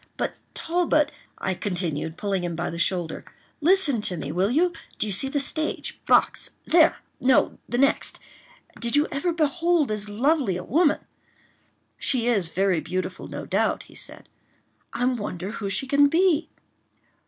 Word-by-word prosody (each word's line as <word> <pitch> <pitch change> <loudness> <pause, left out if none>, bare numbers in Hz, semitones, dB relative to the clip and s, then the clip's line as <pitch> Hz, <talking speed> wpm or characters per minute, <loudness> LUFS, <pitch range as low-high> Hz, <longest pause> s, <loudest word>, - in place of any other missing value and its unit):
"But, - - -1 0.2
Talbot," 325 -3 +1 0.3
I 190 - -1
continued, 175 -5 -3
pulling 195 -3 -1
him 175 -1 -2
by 175 +2 -2
the 170 - -6
shoulder, 170 -1 0 0.4
"listen 315 - +3
to 180 -4 -3
me 145 -2 -4
will 185 +5 +1
you? 340 +8 +2 0.2
Do - - 0
you 205 - -2
see 265 +8 0
the 285 - 0
stage 310 +3 -2
box?—there!—no, 310 -5 +2
the 240 - -1
next.— 275 +3 +2 0.6
Did 235 +3 0
you 295 +1 +4
ever 280 +5 0
behold 330 -2 +1
as 210 -1 -2
lovely 250 - +1
a - - -6
woman?" 310 +3 +2 1.0
"She 250 -4 +1
is 210 -8 +2
very 185 0 +1
beautiful, 185 +4 -4
no - - -6
doubt," - - 0
he - - -18
said. - - -8 0.6
"I 245 - -1
wonder 205 -6 -2
who 210 -3 -4
she 270 - -1
can 285 +2 +5
be?" 330 +1 +2
240 Hz, 155 wpm, -25 LUFS, 185-300 Hz, 1.0 s, can